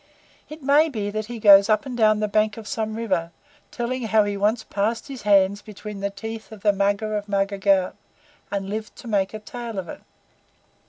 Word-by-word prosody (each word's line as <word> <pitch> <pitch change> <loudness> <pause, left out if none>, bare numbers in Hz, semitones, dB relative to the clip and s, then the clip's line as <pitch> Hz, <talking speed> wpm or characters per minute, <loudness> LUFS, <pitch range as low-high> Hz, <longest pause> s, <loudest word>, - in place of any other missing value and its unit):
It 305 -1 -10
may 290 +4 +4
be 210 -7 -3
he 215 +3 -4
goes 200 0 +7
up 215 +2 +2
and 260 -2 -5
down 215 -2 +3
the 210 - +1
bank 215 +1 +1
of 220 -2 -9
some 220 -1 -3
river, 190 -7 -1 0.4
telling 250 +2 -3
how 220 -1 +4
he 205 0 -2
once 215 +3 +1
passed 220 +7 -2
his 270 -3 -7
hands 200 0 +3
between 210 -1 -9
the 200 0 -1
teeth 220 0 -8
of 215 -3 -11
the 205 -1 +4
Mugger 200 +2 0
of 205 0 -4
Mugger 200 0 0
Ghaut, 195 -2 +2 0.6
and 200 -1 -3
lived 215 +2 -5
to 245 - -12
make 200 -3 +1
a 215 - -5
tale 230 0 -7
of 185 -2 -4
it. - - -9
210 Hz, 205 wpm, -23 LUFS, 200-225 Hz, 0.6 s, goes